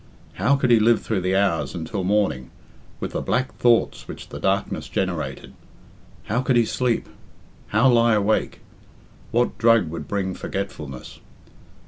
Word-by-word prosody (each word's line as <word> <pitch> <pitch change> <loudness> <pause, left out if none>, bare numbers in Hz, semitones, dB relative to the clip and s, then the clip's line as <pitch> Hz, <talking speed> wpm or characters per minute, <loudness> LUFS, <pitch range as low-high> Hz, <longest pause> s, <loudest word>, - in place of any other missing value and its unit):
How 140 +4 +2
could 130 -3 +1
he 115 - +6
live 115 +1 +3
through 105 -4 -1
the 90 +1 0
hours 95 -4 +1
until 85 +4 -4
morning, 95 -10 0 0.5
with - - -4
the - - -3
black 130 +1 -1
thoughts 120 -1 +2
which - - -9
the - - -7
darkness - - -1
generated? - - -3 0.7
How 120 +4 -1
could 130 -1 +1
he 120 -1 +4
sleep? 120 0 -1 0.6
How 110 +6 +3
lie 115 -2 +4
awake? 105 +1 0 0.7
What 120 +1 0
drug 115 -8 +4
would 80 -3 -6
bring 95 -2 -2
forgetfulness? 80 -12 -6
110 Hz, 145 wpm, -23 LUFS, 95-120 Hz, 0.7 s, he